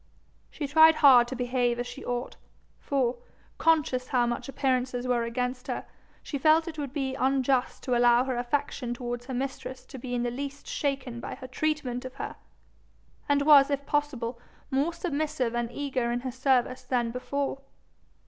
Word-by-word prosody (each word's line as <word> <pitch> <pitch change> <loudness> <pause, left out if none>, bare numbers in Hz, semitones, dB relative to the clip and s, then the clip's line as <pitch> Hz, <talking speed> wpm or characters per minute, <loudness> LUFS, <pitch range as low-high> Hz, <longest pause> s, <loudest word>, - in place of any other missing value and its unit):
She 295 - -5
tried 315 +3 +7
hard 260 -6 +7
to 260 - -5
behave 245 -1 0
as 245 - -2
she - - -8
ought, 245 0 -3 0.4
for, 255 -3 0 0.4
conscious 300 -6 +2
how 245 -2 +2
much 240 +3 -3
appearances 255 -2 0
were 240 -2 +1
against 250 +2 -3
her, - - -3 0.4
she 285 - -4
felt 315 +3 +4
it 315 -2 -6
would 280 -3 -4
be 270 -2 -2
unjust 265 -1 +1
to 250 - 0
allow 240 0 +5
her 260 -1 -2
affection 245 0 -2
towards 245 0 -5
her 265 - -4
mistress 260 0 -5
to 265 - -10
be 245 0 -4
in 240 - 0
the 240 - -1
least 280 +2 -6
shaken 270 -4 -2
by - - -6
her 255 - -10
treatment 265 -2 -2
of 255 0 -8
her, - - -5 0.9
and 285 0 +3
was 285 -2 +7
if 280 -1 -1
possible 260 -6 -1 0.3
more 275 +5 +1
submissive 305 -7 -2
and 240 0 -2
eager 255 -3 -2
in 240 0 -1
her 255 0 -4
service 255 0 +1
than 240 -2 -1
before. 275 +2 -3
260 Hz, 175 wpm, -28 LUFS, 245-280 Hz, 0.9 s, tried